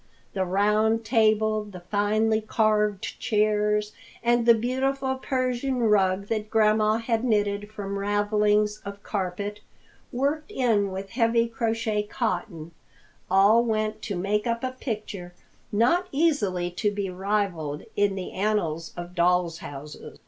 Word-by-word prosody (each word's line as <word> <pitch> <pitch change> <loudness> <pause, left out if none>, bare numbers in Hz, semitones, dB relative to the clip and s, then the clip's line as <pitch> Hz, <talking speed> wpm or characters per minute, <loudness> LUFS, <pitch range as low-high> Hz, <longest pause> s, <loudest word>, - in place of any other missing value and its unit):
The 190 -1 0
round 210 +4 +2
table, 215 -2 +2
the 195 -4 -10
finely 215 +3 +1
carved 215 -2 0
chairs, 210 0 +1 0.3
and 240 0 +2
the 235 - +8
beautiful 265 +3 -1
Persian 255 0 -1
rug 200 -4 +2
that 215 0 -3
Grandma 215 0 +3
had 230 0 -1
knitted 205 -3 0
from 200 -2 -5
ravelings 210 +1 +1
of 200 0 -8
carpet, 200 +1 -3 0.5
worked 285 +6 -1
in 225 - +1
with 190 +1 -6
heavy 230 -1 +2
crochet 225 -2 -1
cotton, 180 -7 -3 0.6
all 200 +5 +5
went 215 -1 -1
to 205 - -4
make 205 +5 -1
up 235 +1 -1
a 255 - -1
picture 210 -8 -6 0.4
not 255 - +2
easily 210 - +1
to 210 +4 0
be 200 -2 -3
rivaled 180 -6 -2
in 205 -1 +2
the 190 -2 -5
annals 180 -6 -1
of 175 0 -7
doll's 175 -1 +2
houses. 145 +1 -9
210 Hz, 130 wpm, -26 LUFS, 195-230 Hz, 0.6 s, the